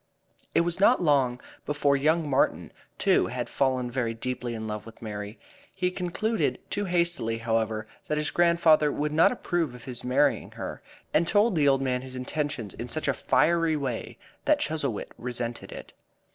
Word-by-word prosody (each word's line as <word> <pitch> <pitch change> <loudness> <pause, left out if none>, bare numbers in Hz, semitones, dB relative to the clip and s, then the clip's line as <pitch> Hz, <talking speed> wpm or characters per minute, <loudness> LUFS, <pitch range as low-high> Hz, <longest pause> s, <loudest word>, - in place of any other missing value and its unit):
It - - +6
was 170 +1 0
not 230 +6 +5
long 135 -7 +2 0.2
before 145 -1 +1
young 155 +3 +2
Martin, 135 -2 +1 0.3
too, - - +3
had - - -3
fallen 130 -2 0
very 120 -3 -1
deeply 125 0 -4
in 110 -1 -5
love 105 -1 -4
with 115 -1 -13
Mary. 105 0 -6 0.4
He 180 -1 0
concluded 195 +5 -1
too 205 0 -1
hastily, 170 -10 +1
however, 110 -1 -1 0.2
that 150 - 0
his 150 -1 -1
grandfather 170 -3 +4
would 150 +1 -2
not 160 - +5
approve 175 - -2
of 120 - -12
his 125 -3 -5
marrying 140 +3 +2
her, - - -6 0.3
and 165 - +3
told 210 +1 +3
the 150 -3 +3
old 135 -1 +3
man 125 -1 0
his 130 0 -8
intentions 130 -4 -3
in 120 - -6
such 155 +6 -3
a - - +3
fiery 165 -1 +2
way 130 -5 -4 0.3
that - - +4
Chuzzlewit 140 -8 -2
resented 120 -1 -4
it. - - -9
140 Hz, 175 wpm, -27 LUFS, 120-165 Hz, 0.4 s, It